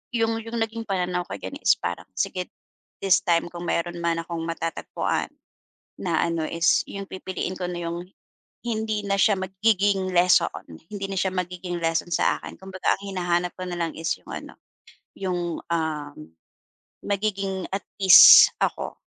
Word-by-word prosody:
yun 225 -1 +1
yung 235 +1 -4
naging 225 0 -6
pananaw 180 -2 -1
ko - - -5
ganiyan 280 - -7
is - - +5
parang, - - -5
sige 180 -1 -2 0.6
this 195 -2 +5
time 170 -1 +2
kung 175 0 -7
mayroon 175 +1 -1
man 170 0 0
akong 170 0 -5
matatagpuan 165 -1 -2 0.7
na - - 0
ano 165 -1 -1
is 165 +2 +2
yung 200 0 -6
pipiliin 185 0 -5
ko 180 - -3
na 175 -1 -5
yung 170 +1 -5 0.6
hindi 220 -2 -1
na 200 0 +1
siya 210 - +5
magiging 190 0 +1
lesson 180 +1 +4 0.4
hindi 200 -1 -4
na 195 - -5
siya 190 +1 0
magiging 180 -1 -4
lesson 165 +1 -1
sa - - +2
akin. - - -10
Kumbaga 190 -1 -1
ang - - -11
hinahanap 180 -2 -1
ko 185 - -5
na 175 -1 -4
lang 165 -2 -1
is 160 +1 -3
yung - - -22
ano, - - -8 0.6
yung 175 -3 -2
uhm, 155 -3 -2 0.9
magiging 195 -2 -2
at 195 - -2 0.2
ease 190 -2 +10
ako, - - -1
180 Hz, 160 wpm, -24 LUFS, 170-195 Hz, 0.9 s, ease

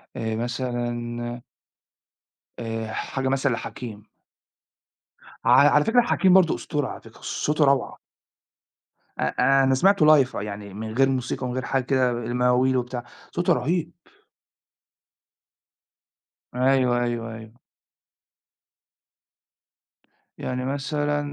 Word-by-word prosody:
آآ، 110 -1 -3
مثلًا 120 0 -3 1.2
آآ، 115 -1 -4
حاجة 135 -1 -3
مثلًا 135 0 +1
لحكيم. 110 -2 -7 1.4
ع - - +4 0.2
على - - +3
فكرة 245 +2 +4
حكيم 190 -6 +3
برضو 185 -4 +5
أسطورة 145 -5 -3
على - - -8
فكرة، - - -16
صوته 150 0 0
روعة. 135 -2 +1 1.2
أ 135 +2 +2
أنا 130 0 +3
سمعته 190 +3 +4 0.2
live 130 - -10
يعني 100 -1 -6
من 110 +2 -6
غير 135 +3 +3
موسيقى 130 0 -2
ومن 125 - -3
غير 130 - -3
حاجة 135 -1 0
كده، 130 -2 +2
المواويل 125 +2 +1
وبتاع، 125 0 -3 0.3
صوته 175 0 +2
رهيب. 170 +3 -1 2.6
أيوه، 125 -1 +2
أيوه، 115 -1 -3
أيوه. 110 0 -11 2.8
يعني 125 0 -4
مثلًا 145 +2 -1
125 Hz, 105 wpm, -24 LUFS, 120-135 Hz, 2.8 s, برضو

